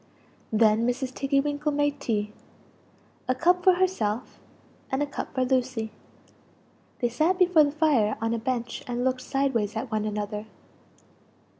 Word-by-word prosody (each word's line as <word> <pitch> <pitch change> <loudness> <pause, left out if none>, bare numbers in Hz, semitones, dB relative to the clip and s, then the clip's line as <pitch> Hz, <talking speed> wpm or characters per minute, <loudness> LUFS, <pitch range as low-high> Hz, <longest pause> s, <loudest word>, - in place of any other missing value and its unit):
"Then 220 +1 +3
Mrs. 255 +1 -2
Tiggy 275 +1 +1
winkle 295 +1 -1
made 290 0 0
tea 210 -5 -2 0.9
a 255 - +1
cup 355 +6 +2
for 370 - +7
herself 265 - -1 0.5
and 265 +2 +1
a - - +1
cup 285 - -6
for 260 -1 +2
Lucie. 250 -4 0 1.1
They 240 - +2
sat 315 +10 +1
before 355 -4 +5
the 285 - -1
fire 285 -9 +2
on 225 0 -1
a 230 - -1
bench 240 -1 -3
and 245 0 -2
looked 255 0 0
sideways 255 -6 0
at 225 +2 -4
one 215 -1 0
another. 210 0 -4
255 Hz, 150 wpm, -26 LUFS, 225-290 Hz, 1.1 s, for